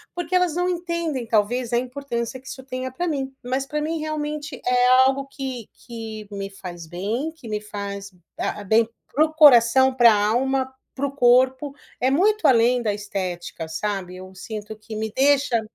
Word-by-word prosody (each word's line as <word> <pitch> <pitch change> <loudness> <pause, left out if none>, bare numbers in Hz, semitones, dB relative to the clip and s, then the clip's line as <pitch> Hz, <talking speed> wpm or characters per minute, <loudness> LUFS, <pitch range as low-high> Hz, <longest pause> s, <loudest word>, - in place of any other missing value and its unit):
porque 350 0 -4
elas 360 -3 +2
não 355 +1 +1
entendem 340 -8 -2
talvez 235 +3 +1
a 235 - +2
importância 255 -1 -4
que 260 - -17
isso 265 - -8
tenha 260 0 -5
pra 345 +7 -3
mim. 270 -4 -2
Mas 260 +2 -2
pra 300 +1 -2
mim 315 +2 -2
realmente 300 -2 -4
é 250 0 +3 0.2
algo 270 +1 0
que 265 -5 -6 0.2
que 220 -3 -7
me 195 -1 -5
faz 175 -4 -9
bem, 215 - -3
que 280 -7 -13
me 210 -1 -3
faz 200 -1 -6 0.3
hã 205 - -3
bem 220 +3 +3 0.2
para 305 +3 +4
o 315 - -6
coração, 265 -3 +6
pra 240 -2 +7
alma, 260 +6 +1 0.2
para 275 - -1
o 280 - -2
corpo. 260 +2 +3 0.3
É 260 - +3
muito 415 +9 +3
além 245 0 +4
da 215 - 0
estética, 180 -5 -5
sabe. 185 +1 -3
Eu 185 0 -11
sinto 210 +2 -7
que 215 0 -10
me 220 0 -3
deixa 275 -3 +3
250 Hz, 180 wpm, -23 LUFS, 215-280 Hz, 0.3 s, pra